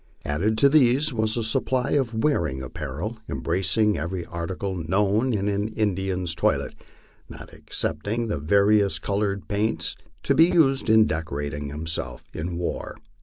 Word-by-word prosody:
Added 100 +10 0
to 140 - +6
these 140 0 +4
was 110 0 0
a 115 - 0
supply 125 +4 0
of 130 -5 +1
wearing 80 - 0
apparel, 80 - -5
embracing 95 +4 +1
every 90 0 -4
article 90 +3 -4
known 100 +8 +1
in 100 -3 -1
an 100 +1 0
Indian's 95 -4 -1
toilet, - - 0 0.6
not - - -11
ex - - -9
cepting 105 +10 -1
the 105 -9 -2
various 100 +5 +3
colored 100 -1 -2
paints 105 +1 -1 0.3
to - - +2
be 165 - +7
used 135 -8 +3
in 110 0 +6
decorating 75 -3 -3
himself 75 -4 -4
for 80 - -5
war. 85 0 -4
100 Hz, 145 wpm, -24 LUFS, 80-110 Hz, 0.6 s, be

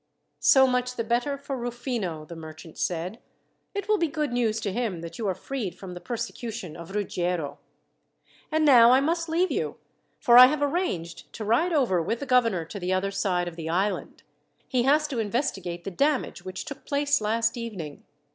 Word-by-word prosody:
"So 265 -3 +6
much 250 -1 0
the 230 - -1
better 245 +5 0
for 275 0 -5
Rufino," 235 - -3
the 170 - -9
merchant 160 0 -10
said. 180 +6 -2 0.6
"It 405 - -3
will 425 -1 +3
be 335 - +2
good 300 -3 -2
news 225 -3 +1
to 200 -3 -2
him 215 -7 -2
that 170 +7 -8
you 220 - -1
are 190 - 0
freed 200 -4 -5
from 185 -1 -8
the 175 - -8
persecution 230 -6 -5
of 170 +3 -9
Ruggiero. 180 -6 -2 0.9
And 310 0 +2
now, 240 -5 +8
I 260 - +6
must 330 +4 0
leave 350 +3 +1
you, - - -2 0.4
for 240 0 +7
I 255 - +12
have 290 +1 0
arranged 180 - -2
to 215 - -5
ride 245 +12 +2
over 245 - +2
with 225 +8 -2
the 280 - -4
governor 230 -10 +2
to 200 +5 -7
the 180 0 -2
other 190 +1 0
side 180 -3 0
of 175 - -6
the 165 -1 -5
island. 190 +5 -1 0.4
He 255 -3 +1
has 300 +1 +4
to 260 -5 -2
investigate 200 -7 -2
the 195 - -5
damage 275 - 0
which 185 0 -6
took 285 -3 -8
place 285 -2 +1
last 225 +2 +1
evening. 200 -11 -6
230 Hz, 195 wpm, -26 LUFS, 180-270 Hz, 0.9 s, I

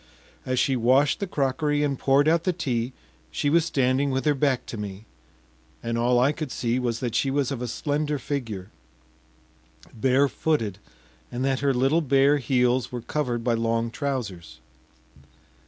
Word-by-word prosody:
As 130 0 0
she 135 +1 +2
washed 130 +4 +3
the 200 - -2
crockery 145 0 0
and 140 -2 -1
poured 140 +2 +3
out 165 +1 +3
the 185 - +2
tea, 125 -7 -2 0.4
she 145 - -1
was 165 0 +4
standing 135 -1 +1
with 130 +1 -1
her 150 - +4
back 135 -2 0
to - - -7
me, 105 0 -7 0.8
and 115 0 -2
all 120 +1 +2
I 130 +4 +4
could 150 -3 -5
see 120 +1 -1
was 120 -2 -2
that 120 -3 -2
she 135 - +1
was 140 0 0
of 130 -3 -4
a 125 - -2
slender 150 +4 -1
figure, 115 -9 -5 1.2
barefooted, 130 - +1 0.5
and 125 +2 -2
that 135 -1 +1
her 140 0 +2
little 135 +6 +2
bare 140 0 +4
heels 125 -1 +1
were 125 -1 -4
covered 120 -2 -2
by 120 0 +1
long 115 0 0
trousers. 100 - -4
130 Hz, 165 wpm, -25 LUFS, 120-145 Hz, 1.2 s, was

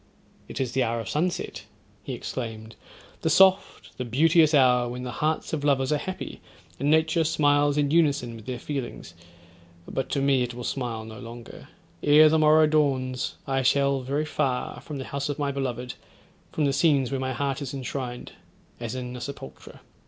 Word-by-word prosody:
'It - - -7
is 130 -3 -1
the 130 - 0
hour 115 -1 0
of 115 - -6
sunset,' 175 +4 -2 0.4
he - - -6
exclaimed; 110 -3 -6 0.5
'the 160 - +1
soft, 190 +4 +3
the - - -1
beauteous 155 +6 +4
hour, 125 -4 +4
when 125 +1 -6
the 125 - -4
hearts 155 +1 -1
of 150 -2 -2
lovers 135 -1 +2
are 150 - +2
happy, 185 +5 -6 0.4
and 140 +3 0
nature 160 +1 +3
smiles 145 -2 +2
in 145 -1 +1
unison 145 -7 +2
with 110 0 -12
their 130 -1 -3
feelings; 130 - -6 0.7
but 135 - -3
to 140 - 0
me 135 -1 +3
it 120 -1 -3
will 125 - -6
smile 120 -4 -3
no 110 0 -10
longer—ere 135 +5 +1
the 160 +1 +3
morrow 155 0 +6
dawns 135 -4 0
I 135 -1 0
shall 140 +1 +2
very 140 +4 -1
far, 135 -5 -2
from 150 - -7
the 130 - -5
house 140 +1 -3
of 145 - -2
my 145 -2 -1
beloved; 125 -2 -3 0.6
from 155 - 0
the 140 - +1
scenes 140 -3 +2
where 135 - -1
my 130 0 -2
heart 140 +3 -2
is 135 -3 -4
enshrined, 130 -2 -5 0.5
as 120 +1 -5
in 125 -1 -5
a 125 - -7
sepulchre. 130 - -9
135 Hz, 180 wpm, -26 LUFS, 125-150 Hz, 0.7 s, morrow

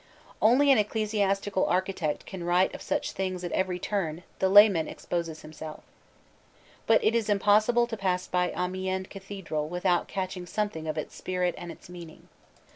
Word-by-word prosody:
Only 265 +6 +5
an 260 - +6
ecclesiastical 205 -2 0
architect 180 -4 -1
can 185 -3 -7
write 175 +2 +2
of - - -8
such - - -2
things 185 -1 -3
at 175 - -4
every 185 -1 0
turn 175 -4 -3 0.2
the 190 - +2
layman 195 -5 +7
exposes 165 -2 -4
himself. 155 0 -9 1.0
But 225 - +4
it 220 - +3
is 225 -3 0
impossible 210 +4 +4
to 235 -1 -5
pass 185 -3 -1
by 180 0 0
Amiens 185 +1 -2
cathedral 190 -6 -5
without 180 0 +1
catching 185 -2 -4
something 180 -5 -3
of 155 0 -3
its 155 - -5
spirit 180 -1 -1
and 175 -1 -7
its - - -13
meaning. 170 -2 -12
185 Hz, 160 wpm, -28 LUFS, 175-205 Hz, 1.0 s, layman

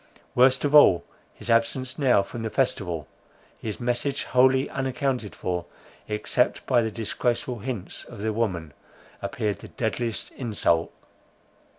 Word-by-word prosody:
Worst 130 +2 +4
of 145 - 0
all, 95 - +7 0.3
his 115 - -4
absence 130 +4 +1
now 125 -8 +4
from 115 +4 -7
the 110 - -2
festival, 90 - -1 0.5
his 110 -2 -5
message 125 +4 -1
wholly 130 +1 +4
unaccounted 130 -4 -2
for, 90 -1 -3 0.4
except 105 +3 0
by 125 -3 +4
the 110 - -1
disgraceful 120 +2 -2
hints 110 -4 -4
of 115 - -11
the 110 +1 -1
woman, 90 -9 -2 0.5
appeared 105 -2 -2
the - - -10
deadliest 115 0 -2
insult. 100 -9 0
115 Hz, 130 wpm, -26 LUFS, 105-130 Hz, 0.5 s, all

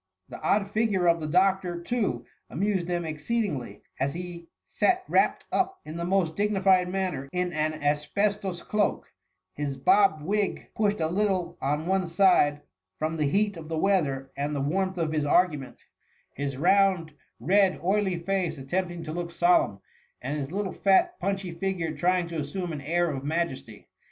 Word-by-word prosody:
The - - -9
odd 200 0 +1
6gure 210 -5 +2
of 170 0 +4
the 155 - -4
doctor, 185 +1 +2
too, 170 - -2 0.2
amused 190 +2 -1
them 175 -1 -1
exceedingly, 155 - -3 0.2
as 140 +3 -1
he 175 -1 -7 0.2
sat 370 0 +1
wrapt - - +2
up 380 0 0
in 155 - -7
the 170 - -3
most 180 -3 +1
dignified 190 -3 +3
manner 180 -8 -2
in 180 0 -1
an 155 0 0
asbestos 175 +6 -1
cloak, 210 -1 -1 0.4
his 140 -2 -3
bob 155 +2 +4
wig 200 +4 -1
pushed 210 -1 +1
a 160 - +2
little 190 0 0
on 150 +3 -1
one 190 0 +1
side 165 -5 +3 0.4
from 155 +1 -2
the 155 -2 +1
heat 205 +3 +1
of 160 -1 -9
the 160 - -2
weather 145 -8 +1
and 145 +1 -2
the - - -1
warmth 185 +6 -1
of 165 -2 -1
his 155 -2 0
argument; 150 -3 +1 0.5
his 140 -1 -4
round, 185 0 +3 0.3
red, 190 - +3
oily 190 -1 +1
face 180 -1 -1
attempting 175 +5 -3
to 155 - -6
look 170 +1 -4
solemn, 345 - +2 0.4
and 150 - -3
his 145 -1 -4
little 195 0 -2
fat, 350 - +3
punchy 195 -2 -2
figure 170 -2 -2
trying 180 +3 +1
to 165 -1 -4
assume 165 +4 -4
an 145 - -5
air 170 +3 +1
of 135 -2 -5
majesty. 145 -8 -3
175 Hz, 165 wpm, -27 LUFS, 155-195 Hz, 0.5 s, of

